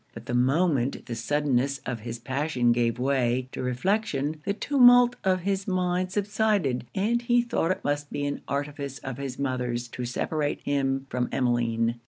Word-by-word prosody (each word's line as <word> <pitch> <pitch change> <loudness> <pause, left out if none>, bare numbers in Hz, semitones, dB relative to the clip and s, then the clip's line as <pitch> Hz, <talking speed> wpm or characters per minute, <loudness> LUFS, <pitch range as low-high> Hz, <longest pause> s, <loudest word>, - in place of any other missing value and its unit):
But - - -9
the - - -4
moment 135 +1 +1
the 120 - -5
suddenness 140 +2 0
of 125 -2 -3
his 115 +2 -6
passion 130 0 0
gave 120 -1 +1
way 130 -1 0
to - - -5
reflection, 150 - -1
the 200 - +1
tumult 245 -2 +6
of 185 -1 +2
his 195 +1 -1
mind 185 -1 0
subsided, 205 - 0
and 225 +5 +1
he 240 0 +3
thought 230 -8 0
it 185 - -1
must 145 0 -1
be 145 - -2
an 145 - -3
artifice 140 -1 -3
of 135 -2 -7
his 135 -2 -5
mother's 125 -3 -2
to 125 0 -5
separate 145 +4 -2
him 135 -1 0
from 125 -1 -1
Emmeline. 120 -2 0
140 Hz, 170 wpm, -26 LUFS, 125-185 Hz, -, tumult